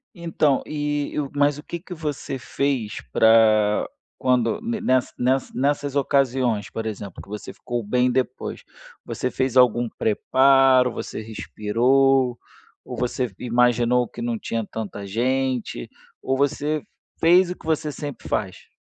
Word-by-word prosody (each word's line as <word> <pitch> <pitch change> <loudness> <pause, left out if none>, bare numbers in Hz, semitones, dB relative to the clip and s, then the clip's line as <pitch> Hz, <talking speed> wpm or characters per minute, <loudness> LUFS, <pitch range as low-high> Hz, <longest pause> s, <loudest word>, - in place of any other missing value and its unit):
Então, 160 -5 +1
e 145 -1 -2
eu 145 -2 -2
mas 145 0 +2
o 150 - -10
que 170 - -6
que 180 +2 -9
você 150 -4 -4
fez 130 -4 -2
pra 110 - +4 0.3
quando 125 - +1
ne 230 -1 -3
ness 130 -6 +1
ness 130 +2 0
nessas 145 +1 -1
ocasiões, 130 -6 +1
por 115 - -5
exemplo, 100 -3 -6
que - - -16
você 105 +1 -7
ficou 120 -1 -4
bem 125 +4 +1
depois. 130 0 -2 0.4
Você 125 - -3
fez 130 -1 -1
algum 120 -1 +4
preparo, 130 +3 +3
você - - -6
respirou 125 +4 +1 0.5
ou - - -6
você 125 -2 -2
imaginou 120 0 +2
que 120 - -10
não 120 -1 -1
tinha 115 +1 -3
tanta 105 -2 -6
gente, 125 - -1 0.3
ou 135 0 -1
você 145 +2 0 0.4
fez 175 +2 +5
o 180 - -4
que - - -18
você 155 -1 0
sempre 145 -3 -7
faz? 95 -3 -3
130 Hz, 145 wpm, -23 LUFS, 115-140 Hz, 0.5 s, fez